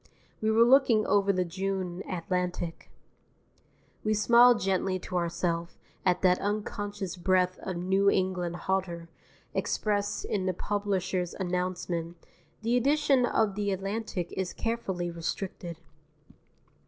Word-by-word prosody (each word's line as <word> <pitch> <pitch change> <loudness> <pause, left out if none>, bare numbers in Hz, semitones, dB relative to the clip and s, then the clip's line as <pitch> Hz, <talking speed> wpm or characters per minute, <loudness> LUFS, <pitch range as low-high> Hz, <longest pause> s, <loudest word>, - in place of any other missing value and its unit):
We 220 - +1
were 220 +1 +6
looking 240 -3 +5
over 200 0 +3
the 185 -2 0
June 190 0 -3
Atlantic. 180 -1 -3 1.1
We 215 0 +1
smiled 235 +3 +6
gently 190 0 0
to 185 0 -7
ourself 170 0 -2 0.3
at 180 +1 +1
that 180 -1 +4
unconscious 205 -2 -3
breath 185 0 +1
of 185 -2 -4
New 190 +3 +3
England 185 -3 0
hauteur 175 -3 -1 0.4
expressed 205 -1 -1
in 190 -3 -1
the 185 - 0
publisher's 190 -3 -1
announcement, 180 -2 -2 0.5
"_The 230 +2 +2
edition 270 0 +3
of 220 -3 +1
the 205 0 -1
Atlantic 195 -1 -3
is 190 -1 -3
carefully 190 -7 -2
restricted. 170 0 -5
190 Hz, 115 wpm, -29 LUFS, 180-205 Hz, 1.1 s, were